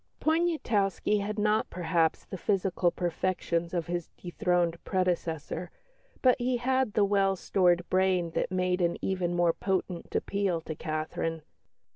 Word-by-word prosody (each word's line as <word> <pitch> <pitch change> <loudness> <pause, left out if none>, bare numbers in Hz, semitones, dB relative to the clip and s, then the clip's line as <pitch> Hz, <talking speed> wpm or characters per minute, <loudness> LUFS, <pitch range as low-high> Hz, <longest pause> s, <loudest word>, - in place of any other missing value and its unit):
Poniatowski 245 - +1
had 210 +2 -3
not 210 +1 +2
perhaps 165 -2 0
the - - -7
physical 190 -2 +1
perfections 170 -1 -1
of 170 -3 -1
his 175 -1 -3
dethroned 175 -1 0
predecessor, 175 -2 -1 0.5
but 255 -1 +6
he 245 0 +1
had 260 -2 +1
the 205 - +4
well 195 -1 +2
stored 175 -2 +2
brain 185 -2 +2
that - - -1
made 180 0 +1
an 170 -1 +1
even 180 -2 -1
more 175 -1 +3
potent 185 -2 -3
appeal 195 -4 0
to 160 - -5
Catherine. 155 +1 -3
180 Hz, 135 wpm, -29 LUFS, 170-200 Hz, 0.5 s, but